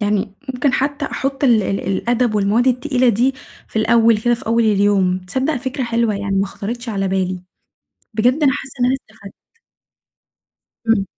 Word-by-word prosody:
يعني 205 -1 -1 0.2
ممكن 250 +1 +1
حتى 285 +3 -1
أحُطّ 270 0 -2
ال 230 -5 +4
ال 195 +1 -2
الأدب 235 +4 0
والمواد 210 +4 +2
التقيلة 255 0 +2
دي 245 +5 +2 0.3
في - - -11
الأول 230 0 +4
كده 240 +2 +2
في 240 +1 -11
أول 230 +1 +2
اليوم، 200 -3 +2
تصدق 260 +11 -2
فكرة 260 +1 -3
حلوة 230 -2 0
يعني 200 -1 -2
ما 195 +1 +1
خطرِتش 235 +5 -6
على 195 -3 -1
بالي، 185 -1 -1 0.7
بجد 245 +8 +2
أنا 275 -2 +5
حاسة 270 0 -6
إن 245 - +3
أنا 255 - +3
استفدت. 215 -6 -11 1.5
امم. 225 -3 +3
230 Hz, 165 wpm, -19 LUFS, 200-255 Hz, 1.5 s, أنا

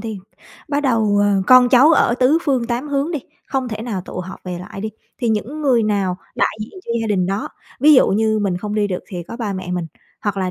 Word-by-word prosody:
đi, 220 -3 -5 0.5
bắt 285 0 0
đầu, 225 -6 +2
ờ, 200 -1 +2
con 255 -1 +7
cháu 265 +5 +6
ở 240 - +3
tứ 260 +6 +3
phương 260 -6 0
tám 245 +4 -3
hướng 285 +2 -1
đi, 305 - -1 0.3
không 265 -2 -2
thể 215 -1 -5
nào 220 -5 -3
tụ 180 - -6
họp 185 +1 -9
về 180 -1 -5
lại 180 +2 -8
đi, 215 +1 -3 0.3
thì 240 -3 -1
những 225 +8 -2
người 260 -6 +3
nào 200 -4 0 0.2
đại - - 0
diện 235 - -8
cho - - -5
gia 225 - -2
đình 190 -4 +1
đó. 195 +2 -2 0.3
Ví 300 +3 +7
dụ 255 - +5
như 220 +2 +1
mình 195 -4 0
không 210 +3 -4
đi 210 -1 +1
được 185 -3 -3
thì 180 -3 -5
có 230 - -9
ba 220 -4 -3
mẹ 185 -1 -5
mình, 175 -2 -2 0.3
hoặc 205 -2 -2
là, 185 -1 -1
220 Hz, 250 wpm, -19 LUFS, 195-255 Hz, 0.5 s, con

